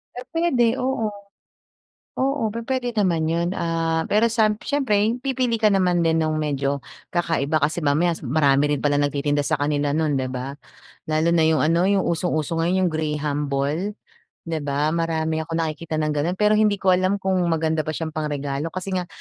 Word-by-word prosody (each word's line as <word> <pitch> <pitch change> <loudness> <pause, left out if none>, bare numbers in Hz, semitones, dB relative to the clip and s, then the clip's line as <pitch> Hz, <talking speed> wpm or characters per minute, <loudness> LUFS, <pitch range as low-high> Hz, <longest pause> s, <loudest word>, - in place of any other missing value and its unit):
Eh, 250 - -6
puwede, 265 -8 +2
oo. 250 -4 -1 1.1
Oo, 270 -4 0
pupwede 245 +2 -2
naman 185 -7 +1
yun, 170 +2 0
ah, 165 -1 0
pero 215 +3 +3
samp 220 -2 +1
siyempre, 230 -6 +1
pipili 255 -3 0
ka 220 -1 +3
naman 180 -3 +2
din 165 0 +2
nung 155 -1 0
medyo 140 -2 -1 0.3
kakaiba. 165 -4 0
Kasi 155 +3 +1
mamaya, 155 +3 +2
sum 150 -5 -7
marami 140 0 +3
rin 145 - -1
pala 145 0 +2
nagtitinda 145 0 0
sa 155 - +1
kanila 145 0 0
nun, 155 -3 +1
'di 130 - -2
ba? 130 +1 -5 0.5
Lalo 160 +2 +1
na 160 - +4
yung 160 0 +3
ano, 170 +3 +2
yung 195 0 +2
usong-uso 165 -2 -1
ngayon, 180 +2 +2
yung - - -2
graham 150 -2 -2
ball, 145 +9 -1 0.6
'di 165 -1 -2
ba? 145 +2 0
Marami 160 -1 -1
akong 165 0 -1
nakikita 160 +1 -4
ng 155 -1 0
gano'n, 160 +5 0
pero 210 +2 +3
hindi 210 -1 +4
ko 190 -1 +1
alam 185 +2 +2
kung 190 -1 +1
maganda 160 -1 0
ba 155 - -2
siyang 160 +1 -3
pang-regalo 145 -1 -3
kasi 185 +3 -5
nga 180 -1 -1
165 Hz, 180 wpm, -23 LUFS, 150-195 Hz, 1.1 s, na